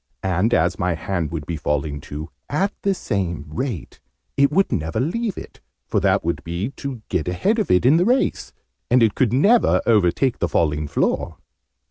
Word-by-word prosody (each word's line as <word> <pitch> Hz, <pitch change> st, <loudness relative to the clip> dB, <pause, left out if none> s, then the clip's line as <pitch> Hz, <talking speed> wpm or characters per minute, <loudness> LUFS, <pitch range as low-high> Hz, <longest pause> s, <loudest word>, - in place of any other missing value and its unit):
And, 95 Hz, +4 st, +1 dB
as 85 Hz, -4 st, +2 dB
my 90 Hz, -1 st, 0 dB
hand 85 Hz, -1 st, -2 dB
would 80 Hz, -3 st, -5 dB
be 85 Hz, -, -3 dB
falling 75 Hz, -1 st, -2 dB
too 75 Hz, +3 st, -7 dB, 0.2 s
at 190 Hz, +8 st, 0 dB
the 195 Hz, -1 st, +1 dB
same 90 Hz, -, -3 dB
rate 100 Hz, -, -5 dB, 0.4 s
it 140 Hz, +1 st, +3 dB
would 195 Hz, +5 st, +2 dB
never 80 Hz, -1 st, -1 dB
leave 200 Hz, -, -1 dB
it, -, -, -10 dB, 0.3 s
for -, -, 0 dB
that -, -, +2 dB
would 80 Hz, -4 st, -2 dB
be 85 Hz, -, -3 dB
to 130 Hz, -5 st, -6 dB
get 80 Hz, -, -1 dB
ahead 195 Hz, -, +1 dB
of 210 Hz, -, -1 dB
it 90 Hz, +5 st, +3 dB
in 140 Hz, +5 st, +6 dB
the 175 Hz, -, +3 dB
race. 255 Hz, +4 st, +1 dB, 0.4 s
And 125 Hz, -1 st, +5 dB
it 110 Hz, -, +3 dB
could 125 Hz, -5 st, +1 dB
never 200 Hz, -, +4 dB
overtake 115 Hz, +4 st, +2 dB
the 90 Hz, -, 0 dB
failing 75 Hz, -2 st, 0 dB
floor!" -, -, -1 dB
95 Hz, 185 wpm, -21 LUFS, -, 0.4 s, in